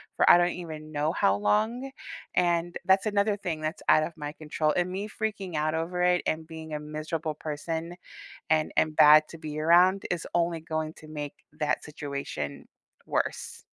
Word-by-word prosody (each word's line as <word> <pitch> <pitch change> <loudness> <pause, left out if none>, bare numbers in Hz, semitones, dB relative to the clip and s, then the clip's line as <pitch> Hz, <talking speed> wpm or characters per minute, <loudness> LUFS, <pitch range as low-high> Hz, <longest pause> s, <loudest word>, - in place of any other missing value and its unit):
for - - +4
I - - +9
don't 175 0 +3
even 155 -3 -8
know 150 +1 0
how 95 - +3
long, 220 - +1 0.5
and 175 -1 +1
that's 190 +3 +4
another 205 0 +1
thing 160 -5 -4
that's 155 +1 -3
out 155 - +6
of 170 - -4
my 150 -1 -5
control, 155 0 -1
and 180 0 +1
me 195 +3 -3
freaking 205 -5 -4
out 155 +1 0
over 175 +2 -1
it 180 0 +3
and 160 0 -1
being 160 -1 -8
a 150 - -2
miserable 155 +1 -4
person, 160 +3 -4 0.6
and 155 -1 +2
and 155 -1 +2
bad 155 0 +8
to 165 - -10
be 155 -1 -5
around 180 +4 +5
is 175 -2 -2
only 170 -1 +1
going 155 0 -3
to 155 - -13
make 150 -2 -6 0.3
that 150 - 0
situation 140 - -5 0.4
worse. - - -2
160 Hz, 180 wpm, -28 LUFS, 155-175 Hz, 0.6 s, I